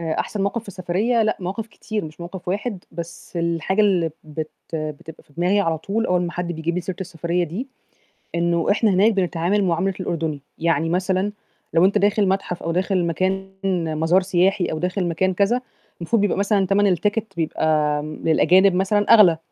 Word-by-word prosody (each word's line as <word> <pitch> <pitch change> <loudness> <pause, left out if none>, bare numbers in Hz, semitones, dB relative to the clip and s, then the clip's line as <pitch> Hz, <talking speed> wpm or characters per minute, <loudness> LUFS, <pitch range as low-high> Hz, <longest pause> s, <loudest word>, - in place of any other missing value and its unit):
آآ، 160 -1 -2
أحسن 205 - -3
موقِف 200 +3 -1
في 225 - -16
السفرية 200 +6 0
لأ، 215 0 +1
مواقِف 195 +5 -4
كتير 215 -1 -5
مش 155 +2 -10
موقِف 175 +1 -7
واحد، 200 0 -3
بس 170 +1 -8
الحاجة 170 +4 0
اللي 185 -6 +3
بت 155 0 -5 0.2
بتبقى 155 0 -6
في - - -27
دماغية 180 +6 +2
على 165 -3 0
طول 215 +8 -1
أول 180 -1 +2
ما 175 -1 -3
حد 175 -1 -3
بيجيب 160 +1 -2
لي 180 - -1
سيرة 180 0 -5
السفرية 175 -1 -1
دي، 190 - -5 0.7
إنه 170 0 +1
إحنا 210 +1 +3
هناك 200 +4 +4
بنتعامل 190 +1 +1
معاملة 180 +2 0
الأردني. 160 -5 -2 0.2
يعني 165 -1 +1
مثلًا 185 +3 0 0.4
لو 165 +2 +5
أنت 200 +2 +4
داخل 205 0 +2
متحف 190 -2 -2
أو 165 - -2
داخل 185 0 +1
مكان 190 +3 -1 0.5
مزار 175 +4 +3
سياحي 190 +1 +2
أو 155 - -3
داخل 180 +2 -1
مكان 185 +3 0
كذا، 200 +6 +2 0.4
المفروض 200 +6 +1
بيبقى 205 - +1
مثلًا 200 -1 +2
تَمَن 200 +2 +3
التيكت 205 +2 0
بيبقى 155 -2 +1
للأجانب 175 +5 +3
مثلًا 205 +4 +3
أغلى 180 -7 +6
185 Hz, 180 wpm, -22 LUFS, 170-200 Hz, 0.7 s, أغلى